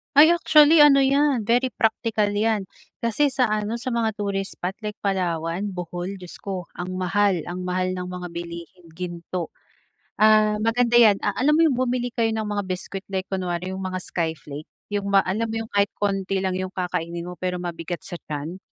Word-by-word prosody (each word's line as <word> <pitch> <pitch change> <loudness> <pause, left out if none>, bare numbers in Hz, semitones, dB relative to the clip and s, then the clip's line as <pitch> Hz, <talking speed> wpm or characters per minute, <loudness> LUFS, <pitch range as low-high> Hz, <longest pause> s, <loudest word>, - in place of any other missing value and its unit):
Ay, 310 +4 +8
actually 315 -2 +6
ano 280 -2 +7
'yan, 275 -3 +2
very 245 +4 +2
practical 220 -2 0
'yan. 215 0 +1 0.4
Kasi 235 +6 +2
sa 255 -4 +1
ano, 215 +1 -1
sa 240 +2 -4
mga 225 -2 0
tourist 200 -2 -3
spot 180 +1 -3
like 210 -1 -5
Palawan, 180 -1 -1
Bohol, 180 +2 -5
Diyos 180 -2 -11
ko! 190 -2 -4
Ang 180 +1 -6
mahal, 185 -1 +1
ang 180 +1 -5
mahal 185 0 0
ng 180 0 -4
mga 180 0 -6
bilihin, 170 +1 -8
ginto. 175 -1 -5 0.6
Ah, 215 0 +5
maganda 240 +1 +2
'yan 220 -4 +7
a 205 - -1
alam 260 +7 +2
mo 330 - +6
yung 285 - +2
bumili 245 -1 -1
kayo 225 -1 +1
ng 220 -1 -2
mga 205 -1 -1
biskwit 190 +1 -5
like 190 -1 -2
kunwari 185 -1 -3
yung 190 - -5
mga 185 0 -3
skyflake, 155 -4 -5 0.2
yung 200 -1 -3
ma 200 - +5
alam 220 +5 -1
mo 225 - -2
yung - - -27
kahit 200 0 +3
konti 195 -1 0
lang 190 -1 -1
yung 185 0 -3
kakainin 175 -2 -3
mo 180 - -6
pero 180 0 -3
mabigat 175 0 -5
sa - - -6 0.2
tiyan. 155 +5 -5
195 Hz, 190 wpm, -24 LUFS, 180-225 Hz, 0.6 s, Ay